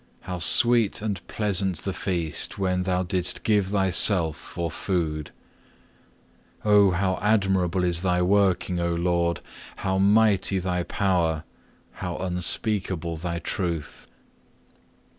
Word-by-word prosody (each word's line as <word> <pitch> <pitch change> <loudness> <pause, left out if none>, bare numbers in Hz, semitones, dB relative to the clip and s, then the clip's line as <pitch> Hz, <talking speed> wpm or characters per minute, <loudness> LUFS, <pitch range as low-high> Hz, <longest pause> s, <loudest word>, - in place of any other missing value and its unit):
How 90 -1 -6
sweet 115 +5 +3
and 105 -3 -3
pleasant 100 -3 0
the 95 - -4
feast 85 -6 -1
when 90 -2 0
Thou 90 0 0
didst 90 0 0
give 105 -3 +2
Thyself 95 -4 +3
for 85 -2 -6
food! 80 -6 -3 1.4
Oh 105 -2 +5
how 95 +1 -1
admirable 95 -4 +1
is 85 -1 +2
thy 90 -1 +1
working, 95 -2 +1
O 85 0 -1
Lord, 85 0 0 0.3
how 95 -1 -2
mighty 100 -1 +3
Thy 90 -1 -1
power, 85 -4 0 0.5
how 90 -2 -6
unspeakable 90 -1 -1
Thy 85 +1 -4
truth! 85 -3 -4
90 Hz, 115 wpm, -24 LUFS, 85-100 Hz, 1.4 s, Oh